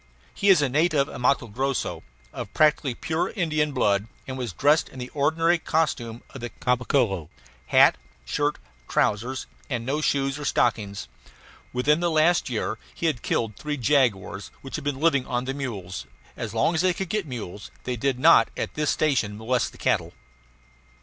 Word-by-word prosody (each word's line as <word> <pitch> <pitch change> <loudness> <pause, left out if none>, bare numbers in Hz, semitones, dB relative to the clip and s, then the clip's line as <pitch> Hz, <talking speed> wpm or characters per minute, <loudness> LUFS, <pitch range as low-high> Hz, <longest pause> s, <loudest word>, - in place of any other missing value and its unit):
He 200 - +1
is 180 -6 +6
a - - +3
native 150 +1 +2
of - - -8
Matto 130 0 +3
Grosso, 130 +5 -2 0.3
of - - -6
practically 150 -4 +3
pure 160 +6 -1
Indian 155 -5 0
blood, 105 -6 +1 0.2
and 130 - -4
was 125 -5 -3
dressed 145 - +3
in - - -13
the 125 0 -6
ordinary 165 +4 +2
costume 120 -9 -1
of 135 - -9
the 120 - -4
Caboclo 120 - 0 0.4
hat, - - +6 0.3
shirt, 145 - 0 0.3
trousers, 120 +6 0 0.2
and 120 -4 -2
no 145 +4 -1
shoes 135 -1 0
or 150 - -5
stockings. 100 - 0 0.6
Within 145 +5 +2
the 175 0 +1
last 160 0 +3
year 110 -2 -2 0.2
he - - -4
had 150 -8 +1
killed 110 -3 -1
three 150 +4 -4
jaguars, 115 -7 +1
which 135 - -9
had 155 - -4
been 145 -2 -2
living 145 -5 +2
on 125 0 -1
the 135 - -2
mules; 95 - -5 0.3
as - - -5
long 170 - +2
as 160 - +1
they 185 -1 +2
could 190 -3 -4
get 210 -4 -1
mules 105 -6 -7
they 125 - -2
did 130 +2 0
not 160 +6 +6
at - - -3
this 150 -1 0
station 120 -9 +1
molest 120 +3 0
the - - -16
cattle. - - 0
135 Hz, 175 wpm, -25 LUFS, 120-155 Hz, 0.6 s, is